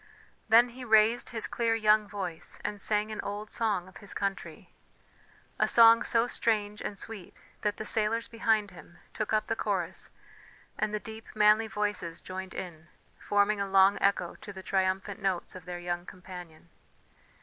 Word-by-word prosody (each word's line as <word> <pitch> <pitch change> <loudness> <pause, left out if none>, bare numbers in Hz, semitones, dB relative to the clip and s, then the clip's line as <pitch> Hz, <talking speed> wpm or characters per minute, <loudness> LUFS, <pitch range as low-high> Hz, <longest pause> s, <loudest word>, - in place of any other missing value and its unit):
Then 235 +2 +7
he 250 +2 -10
raised 220 0 +4
his 225 -2 -2
clear 230 -1 0
young 215 -1 +3
voice, 190 -5 -5
and 205 -1 -2
sang 210 +1 +1
an 215 - -4
old 205 +1 -6
song 205 -6 -1
of 185 - -13
his 200 -1 -9
country, 200 0 -4 0.9
a - - +3
song 230 0 +7
so 230 0 +2
strange 210 -3 0
and 200 - -4
sweet, 210 -4 -8 0.2
that 210 -1 -1
the 215 - -5
sailors 225 +2 +1
behind 220 -3 +1
him 175 -1 -15 0.2
took 215 - -3
up 215 0 +2
the - - -1
chorus 190 -5 -2 0.7
and 210 - -1
the 210 - -2
deep 220 +1 -10
manly 215 +1 +5
voices 205 -6 -3
joined 185 0 -7
in, 170 -2 -7 0.3
forming 205 0 +1
a 200 - -1
long 195 +1 +5
echo 195 -3 +1
to 205 - -8
the 190 -1 -10
triumphant 190 +1 -1
notes 190 -3 -1
of 185 -3 -11
their 180 -1 -5
young 175 0 -4
companion. 180 -3 -11
205 Hz, 170 wpm, -29 LUFS, 185-220 Hz, 0.9 s, Then